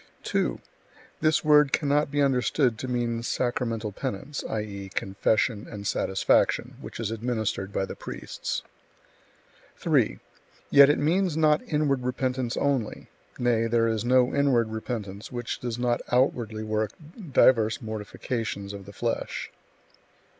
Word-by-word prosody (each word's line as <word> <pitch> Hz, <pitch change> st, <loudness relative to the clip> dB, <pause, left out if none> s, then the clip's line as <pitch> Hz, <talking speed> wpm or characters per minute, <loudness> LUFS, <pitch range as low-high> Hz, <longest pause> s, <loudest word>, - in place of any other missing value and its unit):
2. -, -, 0 dB, 0.6 s
This 155 Hz, 0 st, +2 dB
word 150 Hz, -2 st, +5 dB
cannot 145 Hz, 0 st, +2 dB
be 145 Hz, 0 st, +1 dB
understood 125 Hz, -2 st, +2 dB
to 130 Hz, -, -4 dB
mean 120 Hz, -2 st, -1 dB
sacramental 115 Hz, -3 st, -1 dB
penance, 135 Hz, +9 st, -4 dB
i.e., 100 Hz, -3 st, -4 dB
confession 105 Hz, +2 st, 0 dB
and 105 Hz, -2 st, -7 dB
satisfaction, 95 Hz, -1 st, +1 dB
which -, -, -8 dB
is 110 Hz, -2 st, -2 dB
administered 110 Hz, -4 st, -2 dB
by 95 Hz, -, -1 dB
the -, -, -7 dB
priests. -, -, -5 dB, 1.1 s
3. -, -, +2 dB, 0.5 s
Yet 140 Hz, 0 st, +8 dB
it 145 Hz, -, +3 dB
means 170 Hz, +2 st, +1 dB
not 155 Hz, -1 st, +4 dB
inward 145 Hz, -3 st, +1 dB
repentance 125 Hz, -1 st, -1 dB
only; 135 Hz, -6 st, -1 dB, 0.3 s
nay, 115 Hz, -2 st, +2 dB
there 115 Hz, 0 st, +2 dB
is 110 Hz, -1 st, 0 dB
no 125 Hz, 0 st, +3 dB
inward 130 Hz, -5 st, +3 dB
repentance 110 Hz, -2 st, -5 dB
which 120 Hz, -2 st, -4 dB
does 120 Hz, -2 st, -3 dB
not 120 Hz, -1 st, 0 dB
outwardly 120 Hz, -4 st, +1 dB
work 110 Hz, 0 st, -1 dB, 0.4 s
divers 110 Hz, -5 st, +4 dB
mortifications 110 Hz, -1 st, -4 dB
of 100 Hz, -1 st, -9 dB
the 100 Hz, -, -10 dB
flesh. 115 Hz, +3 st, -3 dB
120 Hz, 130 wpm, -26 LUFS, 110-135 Hz, 1.1 s, Yet